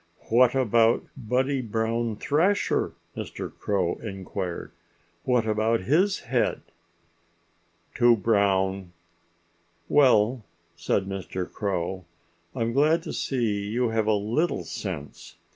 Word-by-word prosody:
"What 125 +2 +5
about 115 -2 +3
Buddy 130 +2 0
Brown 115 0 -1
Thrasher?" 165 - +1 0.2
Mr. - - -6
Crow 95 -4 -1
inquired. 95 -3 -5 0.5
"What 125 -3 +2
about 110 +1 +1
his 175 - +2
head?" - - -1 1.3
"Too 120 0 +5
brown!" 95 -3 +1 0.9
"Well," 125 -4 +4 0.3
said 85 +3 0
old 95 - -8
Mr. 95 -1 -4
Crow, 95 -2 -3 0.5
"I'm 115 0 -1
glad 155 +5 +3
to - - -6
see 110 -6 -1
you 120 +3 0
have 110 -1 0
a 110 - +4
little 115 +12 0
sense. 80 -8 -7
110 Hz, 110 wpm, -26 LUFS, 100-125 Hz, 1.3 s, What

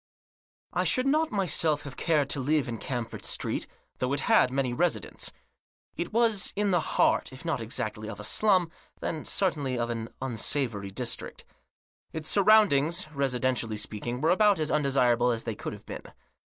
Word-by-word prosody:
I - - +1
SHOULD 255 -1 +1
not 310 +3 +2
myself 165 -6 +1
have 140 -3 -8
cared 150 -5 +1
to 145 - -1
live 145 +1 +1
in 115 -2 -4
Camford 120 -3 -4
Street, - - -2 0.3
though 130 +1 0
it 140 - 0
had - - +4
many 130 -1 -1
residents. 135 - -1 0.6
It 175 - -4
was 225 -3 +2
in 205 0 +1
the 175 - +3
heart, - - +2
if 130 +5 -11
not 160 -7 -1
exactly 110 -1 -4
of 100 - -7
a - - -7
slum, 185 - +2 0.3
then 155 -2 -4
certainly 145 -9 0
of 120 0 -1
an 115 -1 -4
unsavoury 120 -4 -2
district. 115 +3 -5 0.7
Its 160 -1 -3
surroundings, 190 -6 +4
residentially 125 -5 0
speaking, 115 +4 -4
were 160 +2 +3
about 205 -1 +4
as 155 -1 0
undesirable 125 -4 +3
as 115 -1 -1
they 115 - -3
could - - -6
have - - -12
been. - - -7
140 Hz, 170 wpm, -28 LUFS, 120-175 Hz, 0.7 s, had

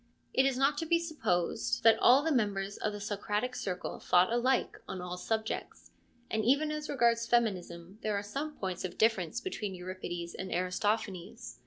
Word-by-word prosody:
It 265 +1 +4
is 265 -2 0
not 280 +2 +2
to 325 - -3
be 335 +1 +4
supposed 235 - -1
that 225 0 +6
all 260 +4 +6
the 320 - +1
members 205 -6 0
of 215 - -1
the 205 - -6
Socratic 210 +4 -2
Circle 180 -2 -4
thought 180 +5 +3
alike 255 +2 +1
on 190 - -5
all 180 0 -5
subjects, 220 +4 -3 0.4
and 220 0 -1
even 285 +6 +3
as 305 0 -4
regards 235 -4 +2
feminism 190 -5 -1
there 215 -1 -1
are 200 - -3
some 285 +9 -4
points 185 -2 -3
of 180 -1 -5
difference 220 -3 +2
between 210 - -4
Euripides 180 -1 -5
and 190 -1 -6
Aristophanes. 180 - -2
215 Hz, 175 wpm, -31 LUFS, 185-250 Hz, 0.4 s, that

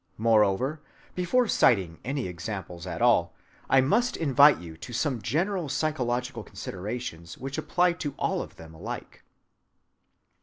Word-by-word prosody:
Moreover, 115 +6 +2 0.3
before 205 +8 +2
citing 95 - +3
any 135 -3 -2
examples 90 0 -6
at 85 -3 -3
all, - - +3 0.3
I 135 - +6
must 240 - +2
invite 145 -1 +6
you 85 -2 -10
to 120 - -9
some 125 -1 -1
general 170 - -1
psychological 125 -4 -1
considerations 95 -3 -6
which 135 +1 -4
apply 180 -1 +2
to 145 -4 -3
all - - 0
of - - -9
them 80 0 -12
alike. 80 - -8
125 Hz, 130 wpm, -27 LUFS, 95-150 Hz, 0.3 s, I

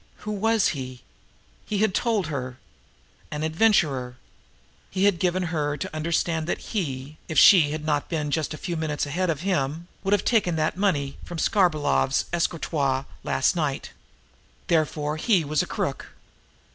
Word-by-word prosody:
Who 210 - -2
was 220 +1 +2
he? 130 -4 -6 0.6
He 210 - -3
had 210 -1 +2
told 225 -4 +1
her. 130 -4 -4 0.7
An 150 +1 -4
adventurer. 155 - +2 0.7
He 190 0 -1
had 200 -4 +3
given 185 0 +1
her 145 -2 -1
to 190 -2 -5
understand 160 0 0
that - - -4
he, 145 -7 -3
if 160 - -4
she 175 -8 +8
had 155 +1 -4
not 150 -2 0
been 150 -3 -2
just 155 0 -1
a 155 - -5
few 175 +1 -4
minutes 155 -2 -1
ahead 175 +5 -1
of 155 -3 -1
him, 170 -2 -1
would 195 +1 +1
have 205 - +2
taken 200 -8 +2
that 155 0 0
money 160 -8 0
from 175 - -7
Skarbolov's 155 - +2
escritoire 145 -5 0 0.2
last 130 +7 +1
night. 150 -5 -2 0.7
Therefore 155 -2 0
he 180 -2 +2
was 150 +1 +1
a - - -4
crook. - - -3
160 Hz, 160 wpm, -25 LUFS, 145-185 Hz, 0.7 s, she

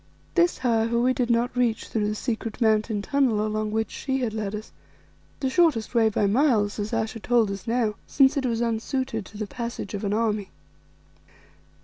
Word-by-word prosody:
This, 345 0 +3
however, 235 -2 +1
we 255 +2 +3
did 250 -1 -1
not 235 +2 +1
reach 240 -3 +1
through 210 -2 -1
the 210 - -1
secret 225 -1 -4
mountain 215 -2 +2
tunnel 245 -7 +1
along 215 0 -1
which 220 0 -1
she 265 -1 -2
had 230 -4 -1
led 215 -2 -3
us, 215 +1 -8 0.7
the 270 - 0
shortest 260 -7 +2
way 225 -2 +4
by 210 -1 +1
miles, 215 -2 +2
as 205 +1 -3
Ayesha 225 0 -2
told 230 -2 +2
us 195 +1 -7
now, 230 -2 +1
since 270 0 +4
it 270 -3 0
was 230 -1 -1
unsuited 230 -1 -2
to 210 - -12
the 215 - -3
passage 235 -2 -5
of 205 - -4
an 200 - -1
army. 210 -2 0
225 Hz, 190 wpm, -25 LUFS, 215-245 Hz, 0.7 s, way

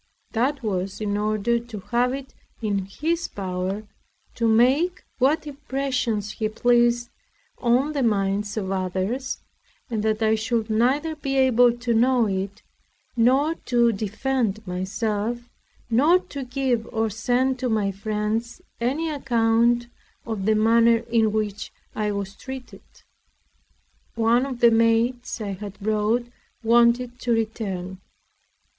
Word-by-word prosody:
That 265 +4 0
was 195 -1 -2
in 205 -1 -1
order 215 +3 +1
to 230 -3 -8
have 245 +1 +2
it 270 0 -6 0.3
in 200 -4 -1
his 330 +11 -2
power 190 +1 -3 0.5
to 230 - 0
make 265 +11 +3 0.2
what 280 +5 +2
impressions 265 -7 -2
he 215 +1 -2
pleased 240 +1 +2 0.5
on 255 +5 +2
the 285 - -1
minds 205 -2 0
of 195 -3 -2
others, 190 +8 -2 0.5
and 220 -2 -1
that 220 +1 0
I 220 0 +3
should 220 0 -1
neither 270 +8 +1
be 275 -3 -2
able 245 -2 +5
to 240 -1 -1
know 245 +1 +3
it, 195 +1 -3 0.5
nor 265 +7 +3
to 240 -6 +2
defend 220 +1 -2
myself, 210 +5 -2 0.4
nor 280 +10 +5
to 280 -7 -7
give 250 -3 -1
or 225 -2 0
send 250 +4 0
to 250 - -1
my 210 -3 +1
friends 215 +3 -3 0.2
any 275 +8 0
account 235 -3 +2 0.4
of 215 -3 -3
the 220 - +4
manner 230 +1 +4
in 225 -2 +3
which 210 -1 -3 0.2
I 210 -1 -1
was 200 -1 -4
treated. 260 +1 -9 1.3
One 235 +3 +3
of 255 -3 -6
the 235 - +7
maids 230 +2 +2
I 210 -2 -4
had 200 +1 -7
brought 215 +3 +1 0.4
wanted 240 +2 +3
to 240 - 0
return. 195 -5 -3
230 Hz, 130 wpm, -24 LUFS, 210-250 Hz, 1.3 s, the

